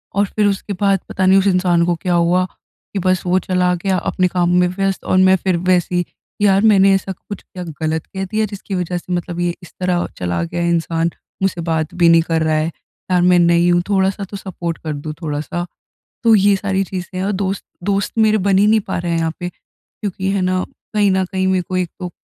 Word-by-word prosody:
और 200 +1 +3
फिर 210 - +2
उसके 200 +1 -2
बाद 195 -2 +3
पता 190 - 0
नहीं 190 +1 +6
उस 195 - +1
इंसान 180 -2 +3
को 175 - +1
क्या 175 +1 -2
हुआ 175 +2 +3 0.5
कि 195 - -1
बस 185 0 +1
वो 180 +1 +2
चला 180 -1 +1
गया 190 -2 +1
अपने 185 +1 0
काम 175 -1 0
में 180 - +4
व्यस्त 195 +1 -2
और 185 - +1
मैं 185 0 +6
फिर 185 -2 +1
वैसे 180 0 +1
ही 175 -1 +1 0.4
यार 195 -1 +4
मैंने 195 -3 +5
ऐसा 195 0 -2
कुछ 200 +2 -8
क्या 180 - -9 0.2
गलत 160 0 -1
कह 190 0 -5
दिया 215 +3 0
जिसकी 200 -1 -6
वजह 180 0 -2
से 180 +1 -5
मतलब 175 0 -3
ये 175 -1 0
इस 175 - -13
तरह 180 -1 0
चला 85 -1 -2
गया 170 - -3
इंसान 165 0 0 0.3
मुझसे 185 -3 0
बात 160 -1 -1
भी 175 -1 +4
नहीं 165 0 +6
कर 165 -1 -1
रहा 155 0 +1
है। 155 - +1 0.5
यार 180 - +3
मैं 180 0 +5
नई 170 0 +4
हूँ, 175 0 +3
थोड़ा-सा 195 0 +1
तो 200 +1 -7
सपोर्ट 175 -4 -5
कर 155 -2 -5
दो, 150 +2 -6
थोड़ा-सा। 155 +2 -3 0.6
तो 230 - +5
ये 200 0 +4
सारी 195 0 -1
चीज़ें 185 -1 -6
हैं। 190 - -1
और 205 - 0
दोस्त 195 0 -2 0.2
दोस्त 200 +1 -1
मेरे 215 -1 +4
बन 195 - +4
ही 205 +2 +4
नहीं 220 0 +4
पा - - -2
रहे 170 0 -2
हैं 165 - +1
यहाँ 165 -1 0
पे। 180 -1 -3 0.3
क्योंकि 190 -1 -4
है 195 - 0
ना, 185 0 0 0.3
कहीं 205 -2 +3
न 190 0 +2
कहीं 190 0 -2
मेरे 185 -1 +2
को 185 - -2
एक 180 -2 -1
तो 180 -1 -4
185 Hz, 235 wpm, -18 LUFS, 175-195 Hz, 0.6 s, नहीं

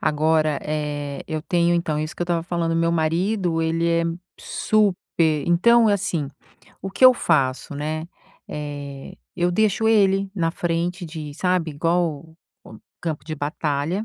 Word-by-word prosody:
Agora, 155 0 +2
eh, 145 -2 -3
eu 155 -1 -2
tenho 175 +1 +1
então 165 -3 0
isso 155 0 -4
que - - -2
eu - - -3
tava 170 -1 0
falando, 170 -1 -1
meu 165 0 +2
marido, 170 +1 0
ele 165 +1 0
é 170 0 +2 0.4
super 210 -4 +1 0.5
então 230 +7 +5
assim, 180 -8 0 0.5
o 195 - -5
que 255 - +2
eu 255 - +9
faço, 140 - 0
né, 155 +3 -4 0.4
eh, 145 +1 -7 0.2
eu 175 0 +1
deixo 215 +3 +2
ele 195 -3 +3
na 165 -4 0
frente 175 +1 -2
de 155 -2 -7
sabe, 180 -1 0
igual 160 0 -1 0.3
o 110 - -12 0.2
campo 160 -4 -4
de 155 - -5
batalha, 150 +6 -2
165 Hz, 150 wpm, -23 LUFS, 155-180 Hz, 0.5 s, eu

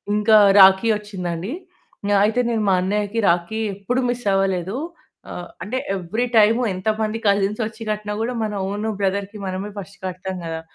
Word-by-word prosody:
ఇంకా 215 +1 +4 0.2
రాఖీ 190 +3 +7
వచ్చిందండి 190 - -5 0.6
ఆహ్, 200 - +4
అయితే 220 +4 +1
నేను 225 -2 0
మా 190 - +4
అన్నయ్యకి 205 +3 -1
రాఖీ 175 +6 0 0.2
ఎప్పుడు 240 +6 -2
మిస్ 245 -1 -3
అవ్వలేదు. 195 +1 0 0.5
ఆహ్, - - -6 0.2
అంటే 250 +5 -3 0.2
ఎవ్రీ 205 +7 -2
టైమ్ 220 +2 +5 0.2
ఎంతమంది 215 +3 -1
కజిన్స్ 200 +2 +1
వచ్చి 220 +1 -13
కట్టిన 210 0 -4
కూడా 245 +1 -2
మన 215 -1 -2 0.2
ఓన్ 210 +2 -3
బ్రదర్‌‌కి 200 +2 -2
మనమే 190 +3 -4
ఫస్ట్ 195 0 -10
కడతాం 185 0 -5
గదా! 165 0 -4
205 Hz, 155 wpm, -21 LUFS, 190-220 Hz, 0.6 s, రాఖీ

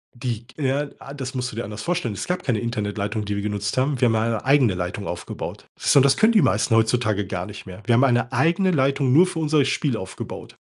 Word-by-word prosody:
Die 120 -2 -4
ja, 140 +1 0
ah, 135 - -10
das 130 -1 -6
musst 125 -1 -2
du - - -10
dir 120 - -3
anders 105 +1 -7
vorstellen. 170 -9 -1
Es 100 - -5
gab 180 0 -1
keine 120 -6 0
Internetleitung, 105 -2 -3
die 100 0 -3
wir 100 - -3
genutzt 105 +1 -2
haben. 135 0 +1
Wir 125 - +4
haben 115 - +1
ja 110 - +2
eine 115 -1 -1
eigene 130 -7 +4
Leitung 90 +3 -4
aufgebaut. 85 - -6
So, 140 - +4
das 135 0 +4
können 220 +1 +5
die 215 - +5
meisten 115 - +2
heutzutage 110 -3 +1
gar 90 -1 -4
nicht 105 - -9
mehr. 95 +2 -11
Wir 120 - +3
haben 125 +4 +5
eine 120 -2 +2
eigene 175 +7 +2
Leitung 135 -2 +2
nur 175 +5 +7
für 180 -2 -5
unser 155 -2 +2
Spiel 135 -2 0
aufgebaut. 95 -1 -8
120 Hz, 240 wpm, -23 LUFS, 105-140 Hz, -, nur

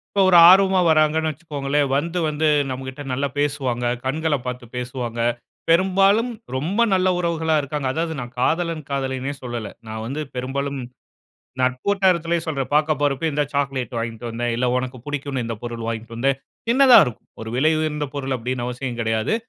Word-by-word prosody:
இப்போ 200 - +4
ஒரு 180 -2 +6
ஆர்வமா 190 0 +6
வராங்கன்னு 155 0 +3
வச்சிக்கோங்களேன். 145 -2 -1
வந்து 170 +4 -2
வந்து 155 +1 0 0.2
நமக்கிட்ட 130 +1 -6
நல்லா 135 +3 0
பேசுவாங்க. 130 -4 -1 0.2
கண்கள 155 +3 0
பார்த்து 125 0 -5
பேசுவாங்க. 125 -1 -4 0.5
பெரும்பாலும் 195 +7 +4 0.2
ரொம்ப 170 - -2
நல்ல 185 0 +3
உறவுகளாக 160 -3 +1
இருக்காங்க. 140 -1 -3
அதாவது, 165 0 -2
நான் 120 0 -6
காதலன் 165 +3 0
காதலின்னே 135 0 -2
சொல்லல. 120 -3 -5 0.2
நான் 110 0 -5
வந்து 140 +6 -4
பெரும்பாலும் 140 +2 -3 0.8
நட்பு 130 0 0
வட்டாரத்திலே 175 -4 +2
சொல்றேன். 140 -5 -2
பார்க்க 155 -1 +2
போறப்பே 145 +2 +1
இந்தா 145 +1 +1
சாக்லேட் 135 -3 -2
வாங்கிட்டு 115 0 -4
வந்தேன். 120 +1 -2
இல்ல 125 - +1
உனக்கு 130 0 -3
பிடிக்குன்னு 140 -3 -3
இந்த 115 - -3
பொருள் 120 -1 -5
வாங்கிட்டு 115 0 -5
வந்தேன். 135 +3 +1 0.3
சின்னதாக 255 - +7
இருக்கும். 120 - -8
ஒரு 110 - -6
விலை 155 +5 +3
உயர்ந்த 150 -2 -1
பொருள் 135 -2 -2
அப்டீன்னு 125 +1 -3
அவசியம் 125 0 -4
கிடையாது. 110 - 0
140 Hz, 155 wpm, -22 LUFS, 125-160 Hz, 0.8 s, சின்னதாக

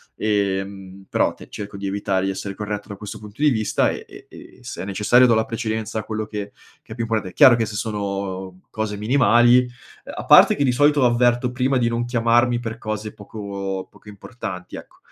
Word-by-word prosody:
ehm, 95 -2 -2
però - - +1
te - - -14
cerco 100 -1 -7
di 100 - -6
evitare, 95 -1 -1
di 95 - 0
essere 100 +1 -6
corretto 105 0 -5
da 100 - -6
questo 105 0 -8
punto 105 +5 -11
di 150 - +6
vista 110 -3 +1
e - - -7
e - - -14
e - - -14
se - - -7
è - - -6
necessario 105 +6 +4
do 115 - +4
la 110 0 +1
precedenza 110 -1 -3
a - - -5
quello 110 -1 -4
che 105 -1 -6 0.3
che - - -11
è - - -10
più 115 - -3
importante. 110 -5 -2
Chiaro 125 - +7
che 115 - 0
se 105 - -7
sono 100 -3 -4
cose 110 -1 -3
minimali, 120 +1 +4
uhm, 125 0 -9
a - - -6
parte - - +7
che 145 - 0
di 130 - +3
solito 145 +1 +3
avverto 120 +1 +2
prima 130 +1 +1
di 120 -2 +1
non 120 0 -1
chiamarmi 120 0 +2
per 115 -1 -6
cose 110 -1 -5
poco 100 -2 -6
poco 105 - -16
importanti 100 -3 -8
ecco, - - -13
110 Hz, 210 wpm, -22 LUFS, 100-120 Hz, 0.3 s, Chiaro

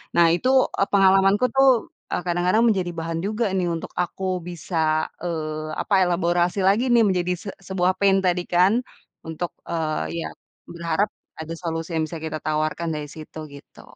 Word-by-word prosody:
Nah 170 -1 +6
itu, 250 +9 0 0.3
eee, 195 - +3
pengalamanku 195 +4 +4
tuh, 270 +3 +3 0.2
eee, - - 0
kadang-kadang 175 +4 +1
menjadi 185 -5 0
bahan 165 0 -3
juga 215 +1 0
nih 185 - +1
untuk 165 - -5
aku 185 +1 -1
bisa, 160 -2 -1 0.2
eee, 155 -2 -3
apa - - -3
ya, 190 - +5
elaborasi 175 +1 +1
lagi 205 +6 +3
nih 235 - +6
menjadi 180 -1 0
se 205 - -6
sebuah 185 -1 0
pain 195 -1 +4
tadi 180 -1 +1
kan 180 +3 +3 0.5
untuk, 165 +2 -4 0.2
eee, 155 - -2
ya, 80 - -3 0.4
berharap 170 +4 -1 0.3
ada 160 +1 -6
solusi 165 -1 -4
yang 160 - +1
bisa 160 0 -7
kita 160 -1 -4
tawarkan 155 +2 -1
dari 150 -1 -4
situ, 155 0 -9
gitu. 140 0 -14
175 Hz, 170 wpm, -23 LUFS, 160-190 Hz, 0.5 s, Nah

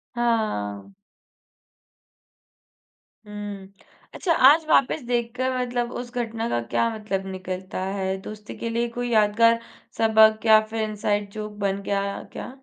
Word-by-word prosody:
हाँ। 210 - -1 2.3
हुँ। 205 -2 -8 0.4
अच्छा 345 - +1 0.2
आज 315 +2 +4
वापस 275 +2 +3
देख 240 -1 0
कर 255 +1 0
मतलब 245 -1 -2
उस 245 -1 -10
घटना 230 -1 -2
का - - 0
क्या 230 - +2
मतलब 200 -3 -3
निकलता 185 0 -5
है, 190 -1 -2
दोस्ती 210 +1 -9
के 230 - -4
लिए 235 +1 0
कोई 245 +1 -4
यादगार 230 +1 +4 0.4
सबक 220 0 +5
या 220 -1 +8
फिर 225 0 -3
इनसाइड 210 -1 -1
जोक 215 0 -6
बन 200 -1 -1
गया, 200 0 -2
क्या? - - -6
215 Hz, 135 wpm, -24 LUFS, 200-235 Hz, 2.3 s, या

